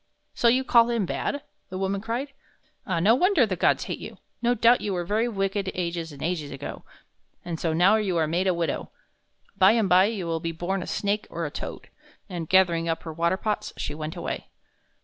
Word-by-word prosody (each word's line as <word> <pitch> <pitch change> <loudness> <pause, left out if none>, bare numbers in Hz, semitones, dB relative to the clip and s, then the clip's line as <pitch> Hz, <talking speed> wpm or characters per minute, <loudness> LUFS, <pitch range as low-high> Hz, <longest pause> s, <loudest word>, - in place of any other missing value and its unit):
"So 235 - +2
you 255 +3 +4
call 235 -2 +5
him 230 -4 +1
bad?" 285 +9 -3 0.3
the 185 - -5
woman 195 +1 -1
cried. 235 +6 -3 0.6
"Ah, 180 -4 0
no 200 +7 +5
wonder 340 - +4
the 195 -4 -2
gods - - +2
hate - - -5
you! - - -9 0.2
No 240 +1 +2
doubt 235 +2 +5
you 205 - -2
were 175 -1 -2
very 215 +6 +1
wicked 195 -2 -1
ages 170 -2 -3
and 140 -1 -9
ages 160 -4 -2
ago, 140 +1 -7 0.6
and 170 -2 -4
so 165 - 0
now 180 +7 +5
you 195 -5 0
are 160 - +3
made 175 +5 0
a 185 - +3
widow. 165 -4 -2 0.7
By 190 +3 +6
and 225 -3 +2
by 185 +1 +6
you 205 -4 -2
will 165 -1 -1
be 165 0 -3
born 180 +4 -2
a - - -6
snake 205 +1 -1
or 170 0 -3
a 150 - -4
toad." - - -7 0.4
And, 175 -5 -5
gathering 170 -3 +3
up 165 - -2
her 160 - -6
water 170 +3 +1
pots, 210 +1 -2
she 145 - -3
went 155 +1 -5
away. - - -4
185 Hz, 215 wpm, -26 LUFS, 165-215 Hz, 0.7 s, By